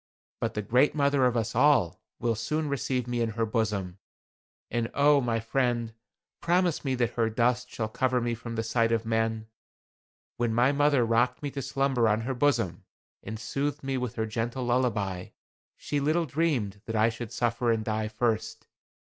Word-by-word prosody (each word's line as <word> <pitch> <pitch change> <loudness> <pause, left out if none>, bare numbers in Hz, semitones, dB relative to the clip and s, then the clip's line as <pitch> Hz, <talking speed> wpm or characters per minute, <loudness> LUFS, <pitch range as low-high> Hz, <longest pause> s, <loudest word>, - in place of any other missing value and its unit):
But - - -2
the 105 - -2
Great 125 +9 +3
Mother 140 -3 +3
of 120 -1 0
us 115 0 -1
all 120 - +3 0.2
will 115 0 0
soon 150 +8 -2
receive 130 -2 -1
me 120 -1 -2
in 115 - +1
her 115 - +2
bosom. 105 -5 -2 0.7
And 120 -1 -1
oh! 145 0 +5
my 115 -2 0
friend, 120 -1 -1 0.5
promise 175 -1 +1
me 135 -2 0
that 120 -2 0
her 115 -2 0
dust 120 +2 +1
shall 110 - -3
cover 130 +3 0
me 120 0 -1
from 115 0 -6
the 115 - -1
sight 115 0 +1
of 115 -1 0
men. 110 0 0 0.9
When 115 -2 0
my 125 +3 +4
mother 145 -3 +3
rocked 120 +4 +1
me 145 - -2
to 140 - -4
slumber 135 -3 +1
on 110 +1 +1
her 130 +4 -2
bosom, 120 -10 0 0.4
and 110 +2 -6
soothed 140 +5 -3
me 135 0 -2
with 125 -2 -3
her 110 - -1
gentle 115 +4 -3
lullaby, 115 -7 0 0.5
she 145 - -2
little 155 +4 +1
dreamed 130 -10 -1
that 115 - -3
I 110 +1 +4
should 115 -1 -7
suffer 120 0 0
and 110 -1 -1
die 110 -1 -1
first. 110 0 -2
120 Hz, 180 wpm, -28 LUFS, 110-135 Hz, 0.9 s, oh